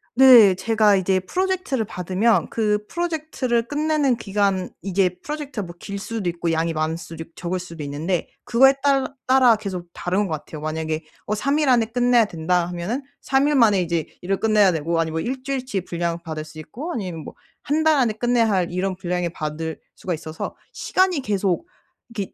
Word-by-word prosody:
네 240 -6 +8
제가 210 +1 +3
이제 190 0 +2
프로젝트를 370 - -1
받으면 190 +5 +1
그 210 -2 0
프로젝트를 310 -9 -1
끝내는 295 -2 +1
기간 200 -3 0
이게 185 -2 0
프로젝트가 290 -8 -5
뭐 170 0 -10
길 200 +2 -6
수도 205 -2 -3
있고 170 -1 -2
양이 165 +1 0
많을 155 +1 -1
수도 165 -1 -8
있고 165 - -23
적을 180 +1 -3
수도 170 -3 -8
있는데 160 +5 -2
그거에 270 +3 +5
딸 275 -2 +3 0.2
따라 255 -3 +6
계속 190 -5 -6
다른 190 +3 -1
것 165 - -3
같아요. 155 0 -7
만약에 155 0 -3 0.2
어 210 - -2
3 275 +7 0
일 300 -3 +2
안에 240 -3 +4
끝내야 245 0 +3
된다 175 -1 0
하면은 180 +10 -3 0.2
3일 280 +2 +2
만에 215 -7 +5
이제 170 -2 -1 0.2
일을 195 +2 -1
끝내야 215 -3 +4
되고 165 +1 -1
아니면 160 0 -1
뭐 245 - -1
1 265 - -6
주일치 255 -7 -2
분량을 170 -1 -3
받을 155 -2 -5
수 155 0 -12
있고 245 - -7
아니면 180 - -5
뭐 - - -10 0.3
1 300 +2 0
달 315 -1 +5
안에 240 -5 +2
끝내야 235 +1 +2
할 185 -4 +1
이런 185 +1 -1
분량에 180 -2 -2
받을 160 0 -5 0.2
수가 180 - -4
있어서 155 0 -6 0.2
시간이 370 -5 +1
계속 200 - 0 0.4
이렇게 210 -5 -5
200 Hz, 375 characters per minute, -22 LUFS, 170-250 Hz, 0.4 s, 네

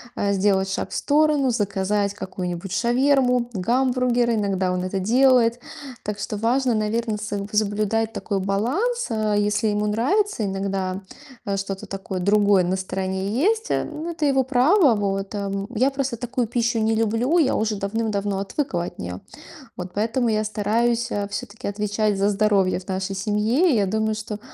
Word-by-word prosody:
а, 200 0 0
сделать 195 -1 +2
шаг - - -3
в - - -5
сторону, 295 -2 +2
заказать 200 -2 0
какую-нибудь 185 -2 -5
шаверму, 250 +1 +2
гамбургер. 245 +3 +1
Иногда 195 -3 0
он 180 0 -2
это 190 +1 -2
делает. 245 +2 +4 0.5
Так 210 -1 -3
что 210 +1 -4
важно, 245 +3 +1
наверно, 215 +1 -1
соб 205 -1 -4
соблюдать 215 +1 0
такой 200 -2 -2
баланс. 260 - 0
А 215 -2 0
если 205 +1 +1
ему 210 0 0
нравится 265 - +1
иногда, 195 -1 -2 0.4
э, 200 -1 -1
что-то 195 +1 -5
такое 195 -1 -5
другое 200 0 +4
на 180 +2 0
стороне 190 +1 -3
есть, 425 - +1
э, - - +1
ну, 325 +3 -5
это 320 -2 -2
его 270 -1 +3
право, 275 - +4
вот, 195 -1 -2
ам. 200 -1 -3
Я 255 +5 +3
просто 270 -3 -3
такую 245 +1 -2
пищу 235 +1 0
не 220 0 +2
люблю, 225 +9 +1
я 290 -5 +3
уже 215 -1 0
давным-давно 200 -1 -1
отвыкла 195 - -2
от - - -9
нее. 90 +1 -6 0.6
Вот 180 0 -6
поэтому 230 +4 0
я 215 0 +1
стараюсь, 230 +3 0
а, 205 -1 -2
всё-таки 225 +2 -6
отвечать 205 0 -1
за 200 - +2
здоровье 200 -3 +2
в 185 - -17
нашей 190 0 -2
семье. 215 - +1
И 260 - +3
я 205 -2 +2
думаю, 220 +2 0
что 215 -1 -6
210 Hz, 165 wpm, -23 LUFS, 195-245 Hz, 0.6 s, делает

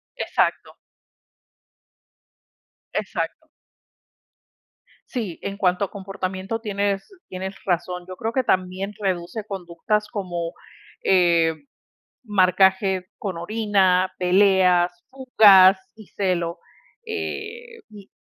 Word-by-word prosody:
Exacto. - - -1 2.2
Exacto. - - -4 1.6
Sí, 220 -10 -4
en 200 0 -5
cuanto 185 0 +1
a - - -13
comportamiento 195 +1 -4
tienes 200 -2 -1 0.2
tienes 190 +1 -6
razón. 180 0 -2
Yo 185 - -8
creo 225 +4 -3
que 260 - +1
también 185 -1 -1
reduce 190 +1 -3
conductas 195 +2 -2
como, 175 -5 -4 0.5
eh, 170 -3 +3 0.7
marcaje 190 -2 +3
con 195 -5 -4
orina, 190 -1 +1
peleas, 180 -1 +4 0.2
fugas 205 -8 +6 0.2
y 215 -3 -14
celo, 175 -3 -2 0.5
eh, 450 +2 -6
y 205 -2 -14
190 Hz, 90 wpm, -23 LUFS, 180-210 Hz, 2.2 s, fugas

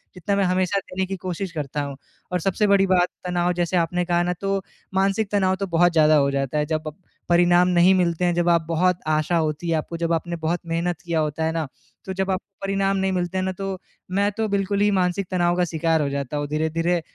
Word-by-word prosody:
जितना 185 +3 -1
मैं 200 - +2
हमेशा 185 +2 +1
देने 190 -1 -4
की 195 +1 -4
कोशिश 185 +1 -4
करता 150 -3 -3
हूँ। 140 -1 -5 0.4
और 180 - 0
सबसे 195 +4 +1
बड़ी 200 -1 +4
बात 180 -1 +3 0.2
तनाव 175 0 +1
जैसे 175 +1 0
आपने 175 +1 0
कहा 175 0 +1
ना, 180 0 0
तो 195 +2 -2 0.3
मानसिक 195 +2 +1
तनाव 190 -2 +2
तो 195 - -2
बहुत 175 0 +3
ज़्यादा 155 -1 +5
हो 140 -2 +3
जाता 135 +1 -1
है, 150 - +1
जब 155 0 -1
प 155 - -5 0.4
परिणाम 175 +1 +5
नहीं 180 +1 +5
मिलते 180 -1 +1
हैं 175 - +2
जब 175 0 +2
आप 170 -1 +4
बहुत 175 +2 +2
आशा 155 +2 +1
होती 155 +1 -1
है, 165 - +2
आपको 165 +2 -4
जब 170 0 -1
आपने 170 +1 -2
बहुत 165 +2 -1
मेहनत 170 +1 -1
किया 170 -2 -1
होता 155 +1 -1
है 160 - +1
ना, 165 -1 -2 0.4
तो 190 - -4
जब 190 0 -1
आपको 190 +1 -5
परिणाम 195 0 +1
नहीं 190 0 0
मिलते 180 0 -2
हैं 185 - 0
ना, 190 - -1
तो 195 0 -5 0.3
मैं 200 +2 +1
तो 220 +2 -2
बिल्कुल 200 0 0
ही 210 - +4
मानसिक 185 0 0
तनाव 175 -1 +2
का 180 - +2
शिकार 165 -1 0
हो 145 - 0
जाता 140 0 -3
हूँ, 145 0 -2
धीरे-धीरे 165 +3 0
175 Hz, 240 wpm, -23 LUFS, 165-190 Hz, 0.4 s, ज़्यादा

